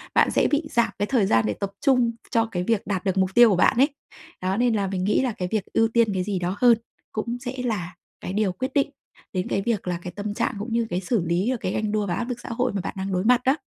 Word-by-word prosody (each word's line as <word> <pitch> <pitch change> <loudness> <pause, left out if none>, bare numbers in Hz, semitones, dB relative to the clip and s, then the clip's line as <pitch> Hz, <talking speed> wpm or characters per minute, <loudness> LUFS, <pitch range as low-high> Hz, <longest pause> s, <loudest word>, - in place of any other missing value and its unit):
bạn - - +4
sẽ - - +3
bị 295 +2 +2
giảm 235 -1 +2
cái 205 - +2
thời 235 -4 +2
gian 115 - +3
để 105 - 0
tập 200 - -4
trung 250 -4 +4 0.2
cho 230 -2 +3
cái 180 -1 -1
việc 210 0 0
đạt 195 -1 -2
được 190 0 0
mục 190 -1 +3
tiêu 240 -1 +8
của 195 - +3
bạn 180 - +3
ấy. 275 +4 +5 0.5
Đó, 185 +2 0
nên 240 -1 +2
là 200 -2 0
mình 185 -1 -2
nghĩ 210 +6 +2
là 255 -3 0
cái 180 -3 -4
việc 215 -3 0
ưu 225 0 +4
tiên 225 -2 +2
cái 185 -1 0
gì 195 -1 -2
đó 180 +2 -2
hơn 240 -2 +6 0.3
cũng 235 +3 -3
sẽ 250 +1 -5
là 180 -8 -3 0.3
cái 185 - -5
điều 210 -2 +1
quyết 260 +8 -4
định 280 - +2 0.4
đến 185 0 -1
cái 195 - 0
việc 215 -4 -1
là 175 -1 -1
cái 180 - -6
tâm 205 0 -4
trạng, - - -1
cũng 225 +3 -5
như 230 -1 +1
cái 180 -1 -1
xử 200 +2 0
lý 175 +8 +1
và 255 - -1
cái 185 - -2
ganh 215 -1 -1
đua 210 -1 0
và 175 - -1
áp 240 +7 -3
lực 245 - -4
xã - - -9
hội 245 0 -1
mà 195 - -1
bạn - - -5
đang 190 +1 -3
đối 185 +1 0
mặt 250 +1 +5
đó. 265 +3 +4
210 Hz, 300 wpm, -24 LUFS, 185-235 Hz, 0.5 s, tiêu